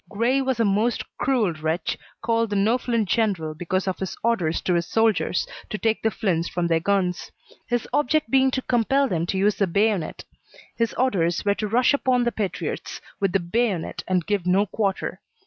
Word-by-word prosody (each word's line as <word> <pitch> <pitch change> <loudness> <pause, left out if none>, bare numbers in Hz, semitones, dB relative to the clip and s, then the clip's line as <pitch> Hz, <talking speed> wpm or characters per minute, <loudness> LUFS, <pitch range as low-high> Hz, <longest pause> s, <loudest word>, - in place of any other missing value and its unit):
Grey 235 +6 +1
was 260 -3 -1
a 230 - +3
most 210 +4 +1 0.2
cruel 235 -10 +1
wretch, 160 +2 -2 0.3
called 230 -1 +1
the 205 - -2
no 215 +5 +2
flint 230 -4 0
general 185 -8 0
because 180 +4 -2
of 185 -3 -2
his 190 - -4
orders 185 -9 +1
to 180 - 0
his 170 -1 0
soldiers 225 -5 +1 0.2
to 215 - -3
take 225 0 0
the 220 - +2
flints 185 -6 -1
from 175 -1 -1
their 165 -1 +2
guns; 180 0 -1 0.4
his 240 -1 -1
object 310 +2 +1
being 265 0 +5
to 260 0 -2
compel 270 +3 +2
them 170 -5 -1
to 190 - -1
use 205 +2 +2
the 200 - +2
bayonet; 200 0 0 0.5
his 230 -2 -1
orders 180 -10 +1
were 200 - +4
to 210 +1 -3
rush 240 +6 +3
upon 255 -3 +2
the 240 - +1
patriots 205 -5 -4 0.2
with 195 -3 +1
the 195 - +2
bayonet 190 0 -1
and 180 -3 +1
give 200 -4 -1
no 190 +3 +3
quarter. 200 -1 -2
205 Hz, 195 wpm, -24 LUFS, 180-235 Hz, 0.5 s, being